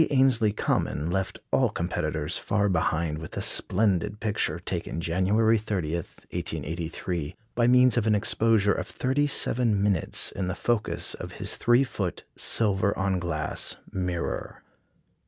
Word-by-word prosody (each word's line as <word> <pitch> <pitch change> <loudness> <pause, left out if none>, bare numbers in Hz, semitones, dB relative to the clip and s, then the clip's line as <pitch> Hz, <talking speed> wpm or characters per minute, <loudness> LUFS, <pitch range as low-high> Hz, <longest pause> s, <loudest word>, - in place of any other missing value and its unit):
Ainslie 130 -6 +3
Common 85 -5 -1
left 95 +1 -2
all - - +3
competitors 80 -2 -2
far 100 -1 0
behind 80 -3 0
with 80 - -8
a - - -1
splendid 105 +1 +1
picture, 105 -7 0
taken 85 -2 -4
January 100 +7 +2
30, 95 -7 -2
1883, 85 -1 -4 0.2
by 120 0 +2
means 125 0 +5
of 115 -2 +1
an 105 - +4
exposure 105 -1 +3
of - - -4
thirty 140 +3 0
seven 115 -7 +1
minutes 100 -6 +3
in 95 -2 -3
the 90 - -2
focus 120 -3 0
of - - -8
his - - -3
3 120 +3 +4
foot 100 -8 -4
silver 100 -2 +1
on 95 -1 0
glass 75 -3 -3 0.2
mirror. 90 -2 -3
100 Hz, 135 wpm, -26 LUFS, 85-110 Hz, 0.2 s, means